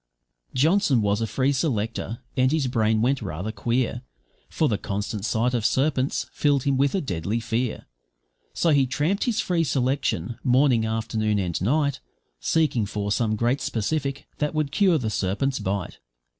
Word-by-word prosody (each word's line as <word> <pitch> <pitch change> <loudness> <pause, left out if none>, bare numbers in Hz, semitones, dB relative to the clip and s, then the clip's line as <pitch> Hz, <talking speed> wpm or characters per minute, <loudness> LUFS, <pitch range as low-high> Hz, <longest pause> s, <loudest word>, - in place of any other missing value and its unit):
Johnson 145 - +3
was 100 +2 +1
a 115 - 0
free 130 +6 +1
selector, 115 -3 -2
and 130 0 +3
his 155 -3 +1
brain 110 -3 +1
went 135 +1 +1
rather 95 +2 -4
queer, 120 +3 -1 0.5
For 155 - +1
the 105 -5 0
constant 105 +1 -3
sight 115 +2 +1
of 120 -3 0
serpents 135 +2 +1
filled 145 -3 +2
him 140 -1 +1
with 140 +4 +2
a 190 - +1
deadly 100 - -2
fear; 115 +1 -2 0.7
So 170 - +2
he 140 -3 +4
tramped 155 - 0
his 235 -3 +1
free 175 -2 +1
selection, 125 - -1
morning, 125 -3 +3
afternoon, 110 -1 -1
and 90 -4 -2
night, 140 +6 +1 0.4
Seeking 150 -10 +1
for 105 0 -3
some 110 0 +1
great 120 +5 0
specific 140 +5 -2
that 150 +1 -1
would 155 -2 0
cure 185 0 +3
the 110 -6 -2
serpent's 105 +8 -1
bite. 95 -1 -3
125 Hz, 160 wpm, -24 LUFS, 110-140 Hz, 0.7 s, he